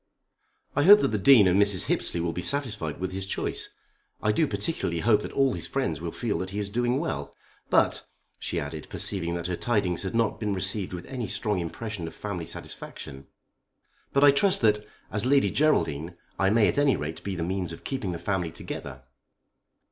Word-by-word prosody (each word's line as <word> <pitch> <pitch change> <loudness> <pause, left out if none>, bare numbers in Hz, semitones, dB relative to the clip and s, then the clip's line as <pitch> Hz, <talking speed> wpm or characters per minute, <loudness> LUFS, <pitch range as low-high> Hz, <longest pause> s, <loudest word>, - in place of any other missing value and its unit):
"I - - +3
hope 205 +7 +9
that - - +2
the 110 -1 -1
Dean 115 -1 +7
and 95 +3 +4
Mrs. 100 -3 +2
Hippesley 85 - 0
will 85 0 -1
be 90 - -3
satisfied 110 - -2
with 95 0 -3
his 95 +1 -4
choice. 95 - -2 0.5
I 105 - +1
do 155 +8 +2
particularly 100 - -1
hope 105 -2 +4
that - - -6
all 135 -2 +2
his - - -5
friends 130 - -2
will 85 - -3
feel 115 +2 -2
that 95 - -3
he 100 - -6
is 100 -1 -2
doing 120 +3 +1
well. 70 - -4 0.3
But," - - +3 0.4
she - - -2
added, 75 +2 -6
perceiving 85 -3 -1
that 85 - -4
her 90 0 -1
tidings 100 -6 0
had 95 +3 -4
not 115 -2 +1
been 105 -2 -1
received 95 +1 -2
with 90 -1 -6
any 125 -5 -4
strong 105 -4 0
expression 90 +1 -5
of - - -9
family 90 -6 -5
satisfaction 65 0 -8 0.8
"but 140 - +3
I 145 - +9
trust 190 +7 +3
that, 105 -2 +4 0.3
as 105 0 0
Lady 140 +1 +4
Geraldine, 85 - +1 0.2
I 95 - +3
may 110 0 +4
at - - +1
any 145 -2 +4
rate 80 +2 -5
be 100 -1 -3
the 85 - -2
means 90 0 -2
of 85 - -10
keeping 130 -9 -3
the 85 - -4
family 95 -2 -1
together." 65 -3 -7
100 Hz, 200 wpm, -27 LUFS, 85-120 Hz, 0.8 s, hope